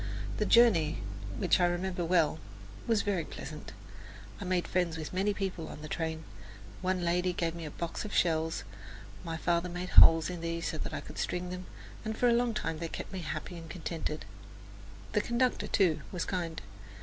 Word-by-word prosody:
The - - +1
journey, 175 -10 +5 0.4
which - - +3
I 175 - +5
remember 175 +1 -1
well 165 -2 +3 0.5
was 225 -3 +3
very 195 -5 0
pleasant. 150 0 -8 0.7
I - - -5
made 180 -1 +1
friends 175 -3 0
with 155 +1 -5
many 195 +3 +2
people 190 -5 -3
on 150 - -9
the - - -5
train. 160 0 -2 0.6
One 185 -1 0
lady 180 +1 +2
gave 170 -1 -1
me 170 -1 -6
a - - -4
box 170 +3 -4
of 210 - -6
shells. 160 -3 +1 0.6
My 165 -1 -3
father 170 +1 +1
made 175 +1 -4
holes 165 -1 +8
in 180 -2 -5
these 170 0 -2
so 155 - -4
that - - -4
I - - -3
could - - -9
string 180 0 -2
them, 180 0 -6 0.4
and 220 -1 -3
for 245 - +3
a 235 - +5
long 235 -1 +2
time 160 -5 -2
they 165 - -2
kept 165 - -6
me 190 - -3
happy 160 +1 -4
and 165 -1 -10
contented. 160 - -4 0.9
The 210 - +2
conductor, 240 +3 +1
too, 170 -7 +3
was 180 -3 -2
kind. 170 -3 -2
175 Hz, 190 wpm, -31 LUFS, 165-185 Hz, 0.9 s, holes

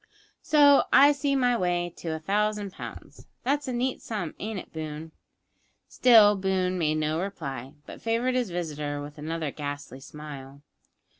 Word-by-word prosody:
So 290 -2 +5
I 280 +3 +8
see 280 -1 0
my 250 -2 +3
way 175 -4 -1
to - - -9
a 160 - -2
thousand 205 +3 -1
pounds. - - -10 0.2
That's 285 +2 0
a - - -2
neat 250 +2 -1
sum, 205 -8 -4
ain't 215 0 -4
it, - - -9
Boone?" 155 0 -6 0.8
Still 220 -4 +6
Boone 190 -1 0
made 155 -2 +1
no 155 +1 0
reply, 140 -8 -6
but - - -11
favoured 230 +3 0
his 250 -4 0
visitor 150 -4 -4
with 145 +1 -9
another 160 -1 -3
ghastly 145 -3 -6
smile. 140 -1 -10
180 Hz, 155 wpm, -27 LUFS, 150-230 Hz, 0.8 s, I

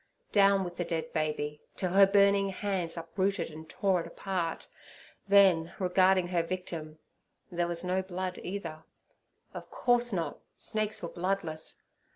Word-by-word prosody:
Down 195 -1 +5
with 175 -1 -7
the 175 - 0
dead 165 -2 -3
baby, 150 -1 -2 0.2
till 185 -2 -1
her 195 +1 +7
burning 200 0 +4
hands 190 -4 -3
uprooted 185 +2 -1
and 160 +1 -11
tore 195 -4 +1
it - - -7
apart; 180 -4 -3 0.6
then—regarding 185 -1 +4
her 175 -2 +2
victim—there 170 0 -6
was 175 0 -1
no 185 +1 0
blood 185 0 -4
either. 165 -5 -6 0.7
Of - - -8
course 245 -1 +2
not: 170 -4 -2 0.2
snakes 215 -2 -1
were 170 - -3
bloodless. 170 -3 -3
180 Hz, 135 wpm, -30 LUFS, 165-195 Hz, 0.7 s, her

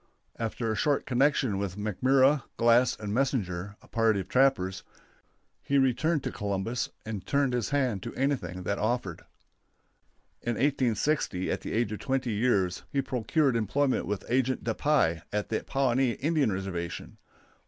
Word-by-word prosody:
After 115 0 -2
a - - -1
short 145 +5 +1
connection 130 -5 +2
with 100 -1 -3
McMurra, 130 +7 +3 0.2
Glass, 120 +2 +4
and 105 -1 -4
Messenger, 105 -7 -1
a - - -17
party 115 -4 +2
of 95 - -5
trappers, 125 -8 +2 0.8
he 140 - +1
returned 135 +3 +2
to - - -3
Columbus 100 +4 -2 0.2
and 105 -3 -5
turned 140 +3 +1
his 120 -3 -1
hand 130 -8 0
to 120 - -7
anything 120 -10 -1
that 100 +2 -2
offered. 110 -5 -1 1.2
In 120 -1 -2
1860, 130 -6 0
at - - -2
the - - -5
age 115 -2 0
of 105 - -4
twenty 130 -2 -1
years, 100 -5 +1
he 140 -1 0
procured 130 +2 +1
employment 130 +5 +1
with 100 -3 -3
Agent 130 +1 0
De 115 - 0
Puy, 100 - +2
at 105 0 -2
the 110 - -1
Pawnee 130 -2 +1
Indian 150 -3 +1
Reservation. 90 -3 -5
120 Hz, 155 wpm, -28 LUFS, 100-135 Hz, 1.2 s, Glass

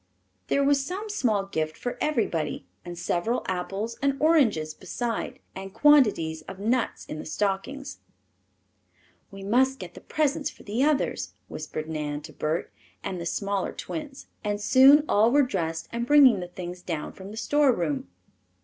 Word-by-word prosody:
There 280 - +2
was 275 0 +3
some 390 +8 -5
small 220 - +1
gift 155 -5 -3
for 245 - -5
everybody 175 - -1 0.2
and 175 -1 -8
several 175 +7 -1
apples 195 +5 -3
and 275 0 +1
oranges 235 - +3
besides, 230 +6 -4 0.2
and 195 +1 -8
quantities 210 - +4
of 190 - -8
nuts 230 +5 -1
in 155 - -6
the - - -7
stockings. 210 - -2 1.3
"We 195 -1 -10
must 260 +6 +2
get 180 -5 -9
the - - -12
presents 300 -1 0
for - - -16
the 220 +6 0
others," 295 -1 0 0.2
whispered 155 0 -5
Nan 150 -2 -3
to 155 +1 -11
Bert 155 +2 -2 0.3
and 185 -3 -4
the 170 - -3
smaller 200 +1 -2
twins, 295 -4 -7 0.2
and 205 -1 -1
soon 270 +7 +7
all 220 +3 +4
were 285 +2 +5
dressed 165 -9 -2
and 235 0 -3
bringing 270 -7 +7
the 180 - -5
things 180 0 -7
down 165 -4 -4
from 190 +1 -10
the 215 - -9
storeroom. 225 - +1
205 Hz, 160 wpm, -26 LUFS, 175-275 Hz, 1.3 s, soon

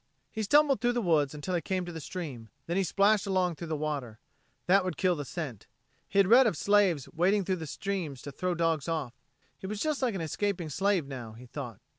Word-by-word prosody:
He 220 - -3
stumbled 280 +2 +4
through 245 0 +2
the 240 - 0
woods 150 -5 +2
until 150 +5 -4
he 175 - +1
came 185 0 -2
to 175 - -6
the 165 -1 -7
stream; 140 -10 -6 0.2
then 170 - -2
he 195 - +2
splashed 200 +3 +3
along 185 -2 +1
through 170 +1 -7
the 160 - -2
water. 145 -7 -3 0.5
That 195 +2 +4
would 180 -5 -3
kill 185 -2 +2
the 145 -2 -5
scent. 135 - -6 0.4
He - - -3
had 200 - +7
read 245 +4 +7
of 175 - 0
slaves 195 -8 +3
wading 190 +4 +2
through 185 -3 -1
streams 170 -6 -4
to 145 - -6
throw 180 +5 -2
dogs 165 -2 0
off. 155 -7 -2 0.5
He 190 - -6
was 210 +1 -4
just 305 0 -1
like 245 -5 +1
an 185 - -3
escaping 175 +1 -2
slave 190 +1 +1
now, 125 -5 -7
he 120 +3 -12
thought. 125 -4 -7
175 Hz, 225 wpm, -29 LUFS, 150-200 Hz, 0.5 s, had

